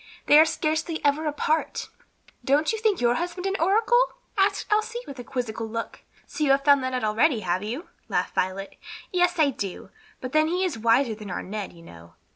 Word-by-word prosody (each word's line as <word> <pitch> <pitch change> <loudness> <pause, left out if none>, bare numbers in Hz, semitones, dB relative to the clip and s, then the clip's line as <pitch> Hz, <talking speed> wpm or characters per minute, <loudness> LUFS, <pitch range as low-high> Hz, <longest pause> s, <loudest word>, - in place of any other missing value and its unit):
They 295 - +7
are 315 - +8
scarcely 315 0 -1
ever 295 +2 +2
apart." 305 +1 -1 0.5
"Don't 295 +7 +2
you 445 - -3
think 430 -3 +1
your 240 -1 +3
husband 355 +5 -3
an 390 0 0
oracle?" 445 +7 +4 0.3
asked 400 0 +1
Elsie, 445 +3 0
with 275 - -9
a - - -6
quizzical 235 -3 -4
look. 230 +1 -5 0.2
"So 305 - -4
you 290 - +2
have 275 0 +4
found 280 -2 +5
that 260 0 -2
out 250 - -2
already, 220 +4 +2
have 180 0 -1
you?" 240 - -5 0.2
laughed - - -1
Violet. 190 +2 -2 0.3
"Yes, 355 -1 +2
I 300 -3 +4
do, 200 -7 -6 0.3
but 255 - -6
then 310 +1 +3
he 360 +3 0
is 350 -7 -2
wiser 230 +2 +3
than 210 -2 -9
our - - -4
Ned, 205 +1 -5
you 170 -1 -16
know. 85 - -14
280 Hz, 205 wpm, -25 LUFS, 225-345 Hz, 0.5 s, are